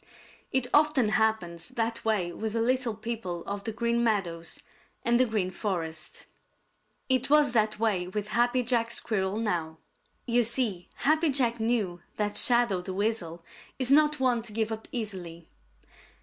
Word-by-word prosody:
It 260 -2 +1
often 295 -6 +4
happens 215 -6 0
that 230 -2 -2
way 205 -6 0
with 220 +4 -4
the 230 - 0
little 245 -1 +1
people 215 -6 -5
of 200 0 -5
the 225 - -2
Green 235 +1 0
Meadows 175 -7 -1 0.5
and 235 +1 +4
the 255 - +4
Green 205 -5 -1
Forest. 175 -4 -4 0.8
It 260 0 +1
was 295 -2 +5
that 215 -3 +1
way 205 -5 0
with 210 +2 -4
Happy 240 +3 +2
Jack 230 -1 +1
Squirrel 205 -4 -1
now. 170 -8 -2 0.5
You 245 0 +3
see, 230 -6 0
Happy 310 +2 +2
Jack 245 -4 +2
knew 220 -6 -1 0.2
that 210 -1 -1
Shadow 235 -5 +3
the 185 +1 -6
Weasel 180 -6 -2 0.3
is 260 0 +1
not 300 0 +4
one 250 -3 +2
to 225 -1 -6
give 220 0 -1
up 220 0 -6
easily. 180 -8 -6
220 Hz, 155 wpm, -28 LUFS, 190-240 Hz, 0.8 s, was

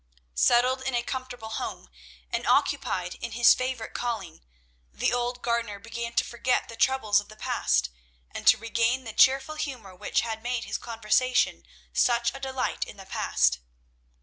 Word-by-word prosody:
Settled 250 - +3
in 260 -1 -2
a 240 - +1
comfortable 250 -3 -5
home, 140 - -5 0.4
and - - -2
occupied 180 -1 +1
in 235 - -5
his 240 +1 +7
favourite 255 -3 -3
calling, 220 -9 -4 0.5
the - - 0
old 245 0 -2
gardener 235 -3 -1
began 235 +3 -5
to - - +3
forget 245 +1 0
the 230 - -8
troubles 225 -6 +3
of 205 - -10
the 215 - -12
past, - - 0 0.4
and - - -7
to - - +8
regain 230 +3 0
the 225 -3 -7
cheerful 270 +5 +4
humour 255 -11 -6
which - - 0
had 225 -1 -4
made 245 0 -2
his - - -4
conversation 235 +2 +1 0.3
such 235 -1 +2
a 275 - -8
delight 265 -1 -2
in - - -10
the 195 - -11
past. 65 - +1
235 Hz, 165 wpm, -27 LUFS, 220-255 Hz, 0.5 s, to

